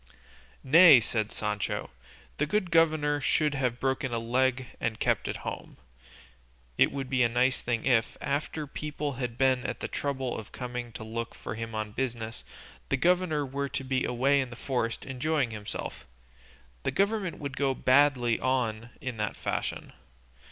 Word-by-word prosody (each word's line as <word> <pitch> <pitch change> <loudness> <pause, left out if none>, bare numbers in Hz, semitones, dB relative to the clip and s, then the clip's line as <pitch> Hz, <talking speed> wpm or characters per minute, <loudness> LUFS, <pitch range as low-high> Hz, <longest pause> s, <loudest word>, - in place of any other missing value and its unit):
"Nay," 155 0 +9
said 110 -2 -2
Sancho, 105 -1 -2 0.5
"the 150 - +1
good 190 -1 0
governor 155 -3 +3
should 150 +3 +2
have 130 -3 0
a - - -16
broken 130 0 -1
leg 125 +3 +1
and 110 -1 -2
keep - - +1
at - - -3
home;" - - -6 1.0
it - - +4
would 135 -2 -4
be 130 -1 +1
a 120 - +4
nice 125 +2 +2
thing 120 -2 -1
if, 120 -4 +2
after 150 +2 -2
people 150 0 -4
had 120 -1 -3
been 130 -1 +3
at - - -4
the - - -3
trouble 135 -3 -2
of 110 - -8
coming 125 -1 -5
to 110 - -7
look 115 +1 -5
for - - -6
him 115 0 -5
on 110 -1 -3
business, 115 -2 -3 0.5
the - - +2
governor 175 -2 +2
were 140 +1 -3
to 135 - -3
be 130 0 0
away 135 +3 +2
in 130 - -4
the 120 - -9
forest 120 -3 -2
enjoying 130 0 0
himself; 105 -1 -6 0.7
the - - -1
government 200 -3 0
would 140 -2 -5
go 140 0 +1
on 130 - -3
badly 130 -3 +4 0.6
in 130 -3 -4
that 105 -1 -2
fashion. - - -3
130 Hz, 165 wpm, -29 LUFS, 115-145 Hz, 1.0 s, Nay